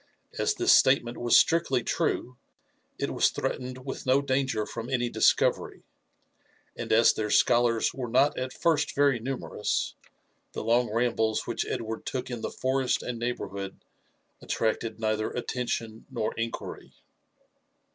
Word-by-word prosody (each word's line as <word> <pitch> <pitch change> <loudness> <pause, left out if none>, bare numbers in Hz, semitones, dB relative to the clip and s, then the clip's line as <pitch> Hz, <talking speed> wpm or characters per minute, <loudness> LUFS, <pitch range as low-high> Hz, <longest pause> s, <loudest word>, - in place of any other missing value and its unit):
As - - +1
this - - +4
statement 120 -3 +3
was 120 0 +5
strictly 135 -7 +3
true, 125 +2 -1 0.6
it - - -2
was - - +3
threatened 130 0 -4
with 135 -1 -6
no 130 +2 +5
danger 130 -5 0
from 115 +2 -6
any 120 -2 0
discovery; - - +2 0.9
and - - -5
as 115 +1 +6
their 105 -1 -3
scholars 120 0 +3
were 130 -2 -4
not 135 +5 +3
at 130 0 -3
first 150 +1 0
very 140 -3 +3
numerous^ 125 -3 -2 0.6
the - - -4
long 120 0 +2
rambles 110 -1 0
which - - -2
Edward 110 -1 -4
took 130 -1 -3
in 120 -2 -4
the - - -3
forest 130 0 0
and 120 -2 -4
neighbourhood 100 -5 -5 0.6
attracted 110 0 -2
neither 110 -1 0
attention 120 -2 -4
nor 110 -2 -2
inquiry. 115 0 -5
120 Hz, 135 wpm, -27 LUFS, 115-130 Hz, 0.9 s, as